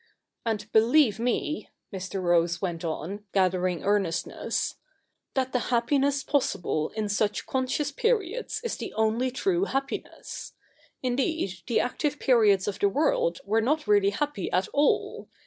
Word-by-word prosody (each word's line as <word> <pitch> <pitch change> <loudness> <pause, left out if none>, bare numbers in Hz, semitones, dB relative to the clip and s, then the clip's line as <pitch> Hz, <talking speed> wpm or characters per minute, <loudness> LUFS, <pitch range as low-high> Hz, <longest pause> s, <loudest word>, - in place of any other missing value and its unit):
And, 215 -2 -1
believe 225 0 +4
me,' 250 +6 -1 0.2
Mr. 190 0 -4
Rose 170 -1 +2
went 175 -4 -3
on, 175 +5 -4
gathering 185 -2 +1
earnest 195 -5 +1
ness - - -3 0.3
' - - -52
that 260 -1 0
the 250 - +2
happiness 275 +3 +2
possible 175 - 0
in 215 -1 -1
such 205 0 0
conscious 265 +2 -1
periods 450 - -1
is 470 - -2
the - - -6
only 220 +4 +1
true 355 +8 0
happiness. 270 -4 -4 0.5
Indeed, 255 - -1
the 235 - +2
active 290 +4 -1
periods 215 -9 +4
of 200 -1 -3
the 200 - +3
world - - +1
were 220 +3 +2
not 300 +6 +1
really 205 -1 +4
happy 205 -1 -2
at 185 +1 +1
all. 290 +1 +1
225 Hz, 145 wpm, -27 LUFS, 195-285 Hz, 0.5 s, believe